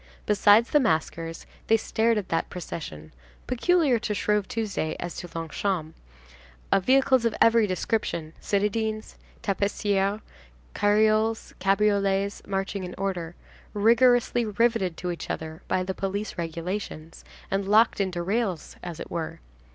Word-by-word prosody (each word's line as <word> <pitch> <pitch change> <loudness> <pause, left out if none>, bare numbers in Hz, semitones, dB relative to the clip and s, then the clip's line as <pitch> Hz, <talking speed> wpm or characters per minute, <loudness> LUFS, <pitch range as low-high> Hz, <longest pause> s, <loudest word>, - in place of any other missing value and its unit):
Besides 210 +3 +5
the 295 - +5
maskers, 165 - -1 0.2
they 225 - +5
stared 225 +1 +1
at 200 -3 -3
that 165 - -1
procession—peculiar 170 - -2
to 215 -2 -2
Shrove 210 -1 +1
Tuesday 205 -8 -2
as 175 - -5
to 175 - -7
Longchamps,—of 65 - -4
vehicles 260 +1 +4
of 230 -2 +1
every 230 -1 +5
description, 180 -4 -2
citadines, 215 +2 -1 0.3
tapissières, 200 0 0 0.5
carioles, 215 +2 +2
cabriolets 200 0 +1
marching 195 0 -2
in 180 0 -6
order, 180 -4 -3 0.4
rigorously 240 +3 +4
riveted 215 -4 +1
to 180 0 -3
each 170 - -6
other 160 0 -5
by 185 - +1
the 190 +1 -3
police 195 +2 -3
regulations, 165 -1 -5 0.3
and 195 0 0
locked 215 +1 +4
into 180 -3 -2
rails, 195 -3 -2
as 170 -2 -7
it - - -8
were. 165 -2 -4
195 Hz, 125 wpm, -26 LUFS, 170-220 Hz, 0.5 s, Besides